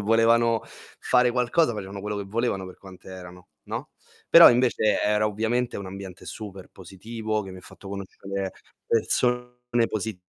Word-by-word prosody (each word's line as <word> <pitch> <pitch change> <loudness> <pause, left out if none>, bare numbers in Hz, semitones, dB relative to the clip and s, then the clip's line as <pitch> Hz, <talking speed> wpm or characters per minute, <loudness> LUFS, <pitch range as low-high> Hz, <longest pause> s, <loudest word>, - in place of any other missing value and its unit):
volevano 115 +1 +3 0.4
fare 125 -1 +3
qualcosa, 125 +3 +2
facevano 100 -2 -6
quello 105 +1 -4
che 100 - -4
volevano 100 -2 -2
per 90 - -11
quante 95 -2 -14
erano, 90 -1 -11 0.2
no. - - -6 0.4
Però - - +10
invece 120 -3 +2
era 105 +1 +2
ovviamente 115 +4 -1
un 100 - -7
ambiente 95 -1 -9
super 100 -4 -8
positivo, 110 +4 -5
che 95 - -9
mi 95 - -10
ha - - -12
fatto 100 - -13
conoscere 100 0 -5 0.3
persone 125 +1 0
positive, 105 -4 -4
105 Hz, 150 wpm, -25 LUFS, 95-115 Hz, 0.4 s, Però